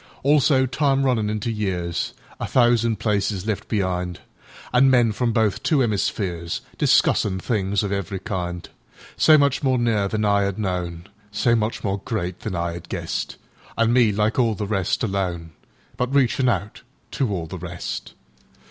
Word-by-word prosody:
Also 140 Hz, -1 st, +4 dB
Time 135 Hz, +1 st, +1 dB
runnin' 115 Hz, -5 st, +1 dB
into 110 Hz, +2 st, -2 dB
years—A 90 Hz, -6 st, -4 dB
thousand 120 Hz, -2 st, +3 dB
Places 100 Hz, -2 st, -1 dB
left 110 Hz, -3 st, -3 dB
be'ind—An' 95 Hz, -, -1 dB
Men 120 Hz, -3 st, +4 dB
from 115 Hz, +3 st, 0 dB
both 110 Hz, -2 st, +1 dB
two 155 Hz, -, +2 dB
'emispheresDiscussin' 95 Hz, -2 st, 0 dB
things 100 Hz, -1 st, 0 dB
of 100 Hz, -, -2 dB
every 100 Hz, 0 st, -2 dB
kind; 90 Hz, -2 st, -4 dB, 0.5 s
So 155 Hz, -1 st, +6 dB
much 140 Hz, -2 st, +2 dB
more 130 Hz, -3 st, +2 dB
near 115 Hz, -4 st, +1 dB
than 110 Hz, +1 st, -1 dB
I 100 Hz, -1 st, +3 dB
'ad 100 Hz, -1 st, -2 dB
known, 90 Hz, -4 st, -3 dB, 0.3 s
So 120 Hz, +3 st, +2 dB
much 110 Hz, 0 st, -2 dB
more 100 Hz, -1 st, -1 dB
great 95 Hz, -6 st, -3 dB
than 105 Hz, -5 st, -4 dB
I 85 Hz, 0 st, -2 dB
'ad 85 Hz, -1 st, -9 dB
guessed—An' 115 Hz, 0 st, -3 dB
me, 120 Hz, -4 st, +4 dB
like 105 Hz, +4 st, 0 dB
all 115 Hz, -3 st, +2 dB
the 105 Hz, -, -3 dB
rest, 100 Hz, -3 st, -1 dB
alone—But 95 Hz, -, -4 dB
reachin' 130 Hz, -1 st, +3 dB
out 105 Hz, -2 st, -2 dB, 0.3 s
to 130 Hz, -7 st, -1 dB
all 90 Hz, -4 st, -2 dB
the 90 Hz, +3 st, -7 dB
rest! 90 Hz, 0 st, -6 dB
105 Hz, 150 wpm, -23 LUFS, 95-120 Hz, 0.5 s, So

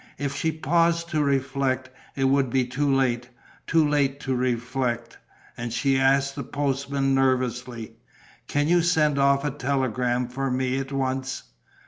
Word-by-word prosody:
If 140 Hz, 0 st, -3 dB
she 160 Hz, -, 0 dB
paused 170 Hz, +2 st, +1 dB
to 155 Hz, -2 st, +1 dB
reflect, 135 Hz, -1 st, 0 dB, 0.2 s
it 135 Hz, -, -1 dB
would 135 Hz, -1 st, +3 dB
be 130 Hz, +1 st, +1 dB
too 140 Hz, +3 st, 0 dB
late, 125 Hz, -2 st, +1 dB, 0.4 s
too 160 Hz, -2 st, +3 dB
late 140 Hz, -2 st, +1 dB
to 135 Hz, -, -2 dB
reflect. 125 Hz, -1 st, -2 dB, 0.4 s
And 120 Hz, 0 st, -5 dB
she 135 Hz, +3 st, +1 dB
asked 135 Hz, +1 st, +2 dB
the 140 Hz, -, -4 dB
postman, 135 Hz, 0 st, -1 dB
nervously: 125 Hz, -3 st, -1 dB, 0.5 s
"Can 145 Hz, 0 st, 0 dB
you 175 Hz, +1 st, +4 dB
send 155 Hz, -4 st, +2 dB
off 140 Hz, +1 st, +3 dB
a 145 Hz, -, 0 dB
telegram 125 Hz, -3 st, -1 dB
for 135 Hz, +2 st, -3 dB
me 130 Hz, +1 st, 0 dB
at 135 Hz, 0 st, -5 dB
once?" 130 Hz, -1 st, -2 dB
135 Hz, 150 wpm, -25 LUFS, 125-140 Hz, 0.5 s, you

